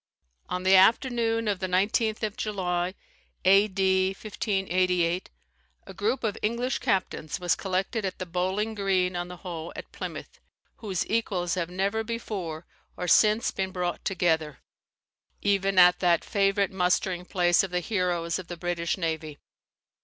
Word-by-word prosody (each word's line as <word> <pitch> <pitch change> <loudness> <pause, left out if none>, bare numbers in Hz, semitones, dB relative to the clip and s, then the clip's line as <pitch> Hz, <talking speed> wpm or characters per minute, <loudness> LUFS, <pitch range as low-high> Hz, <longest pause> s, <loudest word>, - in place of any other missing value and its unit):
On 180 0 -3
the 190 +1 +5
afternoon 230 +2 +3
of 200 -3 0
the 185 - -2
19th 215 +4 +1
of 215 -1 -2
July, 185 -3 -2 0.5
A.D. 190 -1 +4
1588, 185 -4 0 0.6
a - - -10
group 225 +6 -1
of 215 -3 -2
English 235 +4 -1
captains 185 -5 -1
was 175 -2 +1
collected 195 +4 -2
at 190 -1 -3
the 185 - -5
Bowling 185 +5 -1
Green 190 -3 0
on 175 0 -3
the 180 0 -9
Hoe 170 -2 -6
at - - -9
Plymouth, - - -7 0.4
whose 195 -6 -2
equals 190 -6 -1
have 175 -2 -2
never 200 +5 -1
before 195 -8 -5 0.3
or 180 - -3
since 215 +6 +4
been 190 -1 -2
brought 180 -2 -3
together, 160 -5 0 0.8
even 195 -1 +1
at 180 0 +7
that 175 -2 +2
favourite 200 -1 +1
mustering 180 -1 0
place 175 -1 +3
of 195 - -3
the 180 0 0
heroes 175 -3 -1
of 180 - -9
the 175 - -7
British 175 0 -2
navy. 160 -4 -3
185 Hz, 145 wpm, -27 LUFS, 175-205 Hz, 0.8 s, at